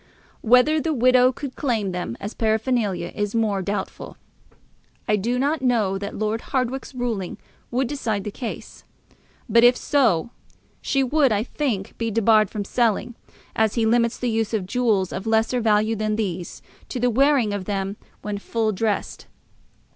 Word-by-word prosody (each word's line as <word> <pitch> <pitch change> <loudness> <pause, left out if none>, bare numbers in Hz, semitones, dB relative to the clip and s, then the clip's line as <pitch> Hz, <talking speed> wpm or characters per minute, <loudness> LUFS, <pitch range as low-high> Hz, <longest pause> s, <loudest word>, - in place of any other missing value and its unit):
Whether 250 +7 +4
the 315 +1 -1
widow 255 +1 +5
could 265 0 -7
claim 225 -8 -1
them 175 -10 -4
as 205 +2 -6
paraphernalia 220 -5 0
is 205 +1 -2
more 210 -4 +1
doubtful. 200 +1 -5 0.9
I 210 - +3
do 230 +5 -1
not 285 +3 0
know 220 -7 +1
that 200 +1 -6
Lord 215 +2 -1
Hardwicke's 260 0 -3
ruling 230 -7 -3 0.3
would 255 +2 0
decide 225 -7 -2
the 210 - -5
case; 235 +2 -7 0.6
but, 230 0 +4
if 245 +1 +6
so, 235 - +1 0.5
she 275 -1 +1
would, 275 0 +3
I 210 0 +1
think, 240 -7 -3
be 230 -1 -1
debarred 215 -1 +3
from 205 -2 -4
selling, 235 +1 0 0.4
as 220 -1 +1
he 230 -2 +2
limits 235 +1 +2
the 245 -2 -1
use 225 0 0
of 200 -4 -2
jewels 210 -3 +1
of 195 +4 -5
lesser 225 +3 +2
value 215 0 +2
than 215 0 -1
these 185 -5 -4 0.3
to 255 - -4
the 245 0 +2
wearing 265 -3 +3
of 200 -2 -4
them 195 0 -2 0.3
when 205 -1 -3
full 220 +1 -1
dressed. 210 +1 -2
225 Hz, 160 wpm, -23 LUFS, 205-250 Hz, 0.9 s, if